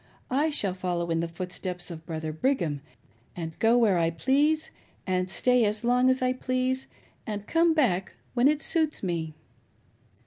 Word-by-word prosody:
I 290 +5 +2
shall 205 -11 +1
follow 175 -2 -2
in 165 - +1
the 165 - -1
footsteps 180 +1 -5
of 160 -1 -9
Brother 160 -1 -4
Brigham, 165 - 0 0.5
and 165 -2 -4
go 230 +2 +4
where 210 -7 +4
I 165 -1 +2
please, 285 - +1 0.3
and 185 -1 0
stay 250 +4 +2
as 210 +1 0
long 250 +2 +3
as 260 0 +2
I 255 0 +2
please, 255 +1 -1 0.4
and 205 -2 -4
come 330 +3 +3
back 195 - +1 0.2
when 245 +1 +4
it 300 +1 +1
suits 315 -6 0
me." 165 -4 -2
210 Hz, 165 wpm, -27 LUFS, 175-260 Hz, 0.5 s, go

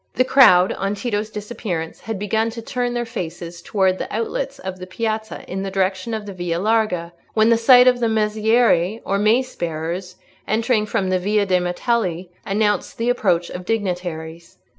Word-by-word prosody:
The 255 - +3
crowd, 185 -10 +6
on 195 +1 -2
Tito's 210 -1 -2
disappearance, 210 -6 -5
had 225 -2 -5
begun 220 +3 0
to - - -4
turn 245 +1 -2
their 240 0 -1
faces 175 -6 -6
towards 190 -1 +1
the - - -5
outlets - - -3
of 185 0 -7
the 185 - -8
piazza 220 +2 -4
in 190 +1 -4
the 195 - -3
direction 190 +3 -1
of 215 -1 -5
the 200 - -7
Via 175 -2 -2
Larga, 190 -4 0 0.2
when 220 +1 +4
the - - +6
sight 250 +2 +6
of 250 -1 +4
mazzieri, 220 -2 +2
or 195 +1 0
mace 235 +5 +2
bearers, 170 +2 -4 0.3
entering 225 0 +1
from 195 -4 -1
the 185 - +2
Via 205 +2 +1
de' 185 -2 +2
Martelli, 180 -1 -1 0.2
announced 205 +1 0
the 235 +1 +1
approach 180 -8 0
of 180 - -6
dignitaries. 175 -5 -4
205 Hz, 175 wpm, -21 LUFS, 180-225 Hz, 0.3 s, crowd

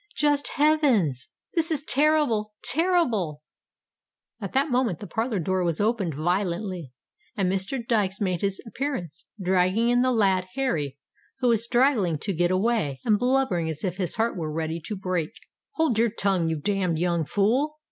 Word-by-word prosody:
Just 290 -1 +2
heavens! 260 - +2 0.3
this 330 0 +1
is 305 -3 +1
terrible—terrible!" 250 - +1 1.0
At 195 - -5
that 275 +2 +1
moment 245 -8 +1
the - - -7
parlour 225 +2 -2
door 185 +1 0
was 170 -2 0
opened 205 - 0
violently, 175 - -2 0.5
and 195 -2 +1
Mr. 195 +7 -1
Dykes 205 -5 0
made 185 -5 -1
his 195 -1 -1
appearance, 225 - -5
dragging 185 +5 +2
in 245 0 +3
the 255 0 +2
lad 190 -5 +2
Harry, 155 - -1 0.4
who 250 - +3
was 230 -2 +2
straggling 235 - +2
to 195 +7 -3
get 175 +1 +1
away, 185 - 0
and 215 -3 +3
blubbering 245 -10 +1
as 155 -1 -5
if 185 -2 -2
his 185 -4 -1
heart 225 +1 0
were 160 -4 -4
ready 160 +1 -3
to 210 - -3
break. 185 -4 -2 0.4
"Hold 320 - +1
your 235 0 +3
tongue, 195 -6 0
you 160 - 0
damned 185 0 0
young 170 -1 0
fool!" 240 - +1
200 Hz, 160 wpm, -25 LUFS, 175-245 Hz, 1.0 s, in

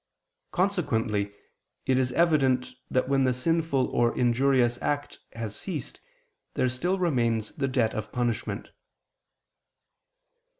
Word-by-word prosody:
Consequently 115 - 0 0.5
it 130 0 +3
is 125 -1 +1
evident 135 -6 +2 0.2
that 130 - +1
when 135 0 +3
the 130 -1 +3
sinful 160 -1 +1
or 120 -1 +1
injurious 125 0 +3
act 145 0 -2
has 110 -3 -5
ceased 155 - -5 0.5
there 130 - +2
still 175 +10 0
remains 120 - +1
the 135 -2 -2
debt 125 -4 +1
of 110 0 -4
punishment. 120 -2 -2
130 Hz, 115 wpm, -27 LUFS, 120-145 Hz, 0.5 s, it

